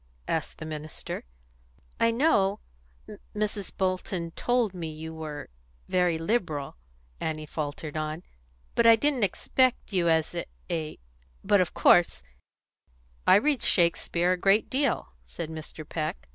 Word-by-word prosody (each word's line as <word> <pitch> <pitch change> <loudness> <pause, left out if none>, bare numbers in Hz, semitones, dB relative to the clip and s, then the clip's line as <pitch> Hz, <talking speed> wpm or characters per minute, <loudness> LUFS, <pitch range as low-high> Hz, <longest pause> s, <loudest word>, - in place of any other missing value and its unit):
asked - - -2
the 160 - -7
minister. 155 - -6 0.7
"I 230 - +4
know 225 -6 +3 0.8
Mrs. 210 -1 -2
Bolton 185 -2 -1
told 240 +1 +1
me 170 -3 -5
you 160 +1 -7
were 155 -2 -6 0.4
very 180 -2 +2
liberal," 165 -6 -1 0.4
Annie 155 -1 -3
faltered 150 0 -5
on; 155 +2 -3 0.5
"but 230 - +4
I 230 - +9
didn't 275 +2 +1
expect 250 +4 +1
you 175 -3 +3
as 160 -1 +2 0.4
a 155 -2 -3 0.5
But 200 -1 +4
of 180 - -2
course 170 - +4 0.5
" - - -34
"I - - +8
read 280 +5 +3
Shakespeare 170 0 +2
a 185 - +2
great 195 +4 +3
deal," 275 +2 +1 0.2
said 165 -2 -6
Mr. 155 -1 -8
Peck. 155 - -4
175 Hz, 130 wpm, -28 LUFS, 155-210 Hz, 0.8 s, I